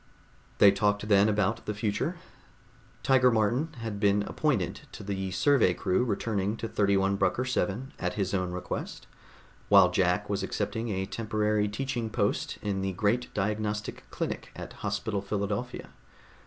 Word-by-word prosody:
They 100 - +8
talked 105 +1 0
then 100 +1 +5
about 105 +2 0
the 105 - -2
future. 105 - -1 0.9
Tiger 125 -2 +5
Martin 120 +7 +1
had 110 -3 -4
been 100 0 +3
appointed - - -1
to - - -8
the 95 -1 -3
survey 115 -4 +3
crew 95 +4 +1
returning 105 -2 -1
to 115 - -4
31 100 -2 +2
Brucker 100 +5 +1
VII, 130 0 -2
at - - -2
his 100 -2 -1
own 90 -2 0
request, 90 0 -5 0.6
while - - +7
Jack 90 +2 +1
was 100 -1 -1
accepting 105 +4 -2
a 95 -2 -1
temporary 105 0 0
teaching 120 +1 -3
post - - -1
in 100 -2 -1
the 95 0 -2
great 110 +6 0
diagnostic 105 +1 -2
clinic - - -4
at - - -8
Hospital 100 -2 -2
Philadelphia. 100 +4 -3
105 Hz, 145 wpm, -28 LUFS, 100-115 Hz, 0.9 s, They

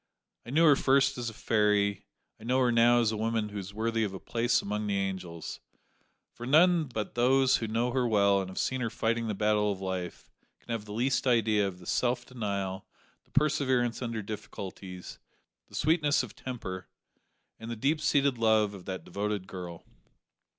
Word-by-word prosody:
I - - -7
knew 160 +6 +4
her 150 -3 +7
first 135 0 +3
as 120 -1 -2
a - - -10
fairy, 105 -3 +1 0.3
I - - -14
know 125 +3 +1
her 125 -1 +3
now 120 +1 +5
as 110 -2 +2
a - - -2
woman 110 0 -1
who 105 0 -5
is 95 0 -7
worthy 115 +2 -1
of 100 -3 -3
a - - -6
place 120 0 +1
among 105 +1 -3
the 100 -1 0
angels, 95 -4 -4 0.7
for 120 - -8
none 165 +3 +5
but 110 -6 -5
those 130 +2 +4
who 115 - -3
know 115 +3 0
her 125 -1 +1
well 100 -3 +3
and 95 - -5
have 95 - -10
seen 130 -1 -1
her 115 - -1
fighting 115 +1 -1
the 105 - -2
battle 105 0 +2
of 95 - -5
life 95 -2 -5 0.3
can - - -10
have 115 -2 -3
the 105 - -10
least 130 +5 0
idea 110 -4 +3
of 95 -2 -6
the 90 - -14
self 125 +5 0
denial, 100 -5 -4 0.4
the - - -32
perseverance 130 -5 +1
under 115 -3 -3
difficulties, 95 -3 -8 0.5
the - - -13
sweetness 150 -2 +2
of 115 - -9
temper, 95 -8 -6 0.7
and 115 - -8
the 120 - -3
deep 145 +7 0
seated 140 -4 +2
love 110 -2 +3
of 95 -3 -11
that 95 -1 -5
devoted 105 -1 -3
girl. 90 -2 -8
110 Hz, 190 wpm, -29 LUFS, 100-125 Hz, 0.7 s, her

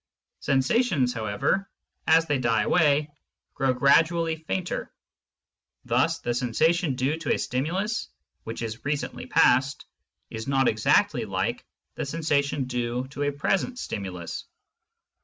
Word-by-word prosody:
Sensations, 135 - +2
however, 110 - -1 0.4
as 160 +1 +5
they 145 -4 0
die 115 -3 +2
away, 150 -3 +3 0.4
grow 135 -1 +1
gradually 160 +5 +3
fainter; 170 +3 -4 0.9
thus - - +2
the 120 - -2
sensation 150 +6 +1
due 135 +5 0
to 165 -3 -2
a - - -2
stimulus 185 - -2 0.3
which 115 +1 -5
is 115 0 -5
recently 145 0 -3
past 130 +3 +3 0.5
is 110 0 -6
not 135 -1 +2
exactly 110 -1 +2
like - - -2 0.3
the - - -4
sensation 145 -2 0
due 125 0 -2
to 140 - -7
a 145 0 +1
present 195 - -1
stimulus. 95 - -5
140 Hz, 120 wpm, -26 LUFS, 125-160 Hz, 0.9 s, as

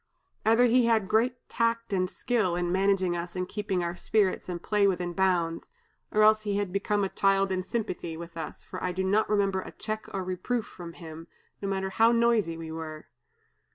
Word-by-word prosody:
Either 225 +2 +6
he 245 0 +4
had 220 -4 +2
great 235 +5 +2
tact 230 -1 0
and 185 -1 +1
skill 215 -7 0
in 175 0 -1
managing 190 -1 +2
us 175 +1 -5
and 180 0 -2
keeping 195 -3 -2
our 170 0 -2
spirits 200 -1 0
and 175 -1 -5
play 210 -1 +3
within 180 -2 -1
bounds, 175 -3 0 0.4
or 215 - +3
else 215 0 +6
he 205 -1 0
became 200 +2 -1
a 195 - 0
child 195 0 +2
in 185 -1 0
sympathy 185 -5 -4
with 170 0 -9
us, 160 -2 -6
for - - -8
I 180 - -1
do 190 +1 -1
not 205 +3 +2
remember 195 -2 +1
a - - -9
check 215 0 -5
or 190 - -3
reproof 185 +6 -2
from 170 -2 -10
him, 165 -1 -10 0.3
no 200 - -2
matter 190 0 -2
how 225 +4 +4
noisy 230 -8 +2
we 165 -1 -7
were. 160 -1 -7
190 Hz, 195 wpm, -28 LUFS, 175-215 Hz, 0.4 s, Either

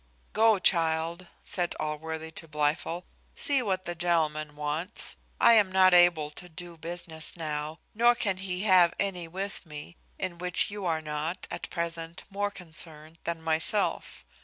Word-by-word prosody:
"Go, 220 -1 +5
child," 165 -1 +1 0.2
said 175 -2 -1
Allworthy 160 +1 -4
to 165 - -5
Blifil, 150 +3 -1 0.3
"see 280 -2 +3
what 190 -5 -1
the 175 - -2
gentleman 155 -3 0
wants. 150 +7 -3 0.2
I 235 - +7
am 210 -4 +5
not 185 -1 +6
able 175 -4 +5
to 180 +3 -10
do 175 +1 -8
any 170 - -15
business 165 0 -3
now, 155 -1 -3 0.2
nor 240 +2 +5
can 200 -5 0
he 190 0 -3
have 185 -4 +6
any 180 -4 -1
with 195 +4 -4
me, 150 0 -9 0.2
in 180 -3 -4
which 180 +3 +1
you 205 -3 -4
are 160 -1 0
not 155 +3 -3
at - - -5
present 170 -1 -3
more 205 +1 -1
concerned 160 -4 -5
than 165 -1 -3
myself. 160 +6 0
170 Hz, 160 wpm, -29 LUFS, 160-185 Hz, 0.3 s, I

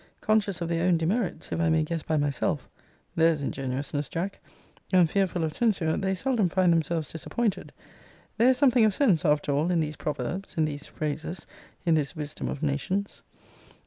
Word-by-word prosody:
Conscious 210 -4 +1
of 170 - -1
their 170 +1 0
own 175 -2 +4
demerits, 175 0 -1
if - - -1
I 165 -1 +2
may 160 0 +3
guess 165 +1 -3
by 155 +1 -1
myself, 145 -2 -1 0.5
[There's 160 -3 +3
ingenuousness, 135 +2 -3
Jack!] 190 +4 -3 0.5
and 180 -3 +5
fearful 180 -1 0
of 155 -1 -1
censure, 185 -8 +1
they 190 0 0
seldom 225 -3 +1
find 180 0 +3
themselves 160 -1 0
disappointed. 210 +6 -2 0.7
There 235 +3 +5
is 260 - +3
something 255 -4 +4
of 215 -3 +3
sense, 195 - +3
after 150 -1 +2
all 150 +5 +1
in 175 -2 +2
these 155 -1 -2
proverbs, 150 +8 -4
in 160 - +3
these 145 -1 -5
phrases, 155 +3 -4 0.4
in 165 - +4
this 150 0 0
wisdom 150 -2 -5
of 145 - -4
nations. 155 +8 -2
165 Hz, 175 wpm, -27 LUFS, 150-190 Hz, 0.7 s, and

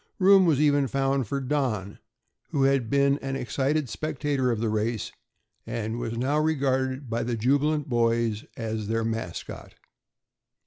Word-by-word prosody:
Room 190 -1 +6
was 150 -5 +3
even 145 -2 +3
found 135 -2 0
for 140 - -2
Don, 125 -8 -2 0.5
who 140 - +1
had 135 -4 +2
been 140 +1 +3
an 135 0 -4
excited 135 +3 -1
spectator 145 -1 -1
of 115 -3 0
the 115 - 0
race 110 0 -1 0.6
and 115 +1 -3
was 115 -1 -4
now 140 +5 +1
regarded 135 -3 0
by 115 0 -2
the 120 0 -2
jubilant 145 +6 +1
boys 115 -3 +1
as 110 -2 -3
their 115 +1 0
mascot. 115 -7 -5
130 Hz, 145 wpm, -26 LUFS, 115-140 Hz, 0.6 s, Room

